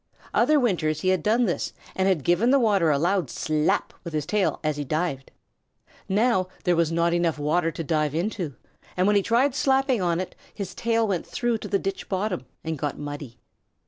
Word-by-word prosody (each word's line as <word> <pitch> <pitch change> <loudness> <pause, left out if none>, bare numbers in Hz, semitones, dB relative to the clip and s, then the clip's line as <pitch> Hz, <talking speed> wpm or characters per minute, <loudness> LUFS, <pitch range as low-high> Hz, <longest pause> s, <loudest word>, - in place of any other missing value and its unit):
Other 305 -1 +4
winters 165 - 0
he 185 - +1
had 185 -2 +2
done 230 +7 +2
this 175 - -2 0.2
and 190 0 +1
had 180 -7 +1
given 175 +8 +3
the 275 - +5
water 205 -9 +3
a 145 - +3
loud 180 +4 +1
slap 155 -1 0
with 170 - -7
his 150 -2 -1
tail 205 +2 0
as 155 -1 0
he 145 - -2
dived. 145 -2 -2 0.8
Now 205 -1 +2 0.2
there 180 -1 +3
was 165 -1 +2
not 170 +1 +2
enough 170 -2 +1
water 160 +3 +1
to 165 - -5
dive 150 -1 0
into, 175 - -2 0.4
and 185 - +3
when 205 +1 +3
he 200 - +5
tried 245 +6 +2
slapping 265 -4 +2
on 170 -1 +1
it 185 0 -4 0.2
his 200 -3 -5
tail 230 -1 +1
went 185 -4 -2
through 240 -2 -1
to - - -6
the 200 - +1
ditch 195 0 -4
bottom 190 -7 -2 0.2
and 160 -2 -3
got 145 +1 -2
muddy. 145 -4 -7
180 Hz, 205 wpm, -25 LUFS, 155-210 Hz, 0.8 s, the